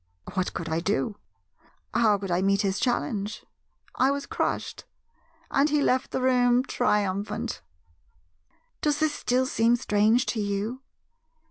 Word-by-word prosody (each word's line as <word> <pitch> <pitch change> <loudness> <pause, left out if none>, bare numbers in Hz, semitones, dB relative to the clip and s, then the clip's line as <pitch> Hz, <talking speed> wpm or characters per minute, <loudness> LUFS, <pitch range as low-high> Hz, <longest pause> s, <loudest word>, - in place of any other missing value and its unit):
What 185 -1 -1
could 170 - -4
I 160 0 0
do? 205 +4 -1 0.8
How 215 -2 +4
could 195 -2 -5
I 175 +1 +2
meet 195 +1 +2
his 195 0 0
challenge? 215 -4 -2 0.5
I 260 - +3
was 280 0 -2
crushed; - - -3 0.7
and 285 +2 +3
he 300 0 +2
left 260 -2 +1
the 255 - -2
room 250 -1 +4
triumphant. 210 -1 -1 1.2
"Does 295 -1 +1
this 310 -1 +1
still 255 -1 +1
seem 235 -2 +3
strange 220 +2 +2
to 225 - -3
you? 205 +5 -2
225 Hz, 135 wpm, -26 LUFS, 200-255 Hz, 1.2 s, How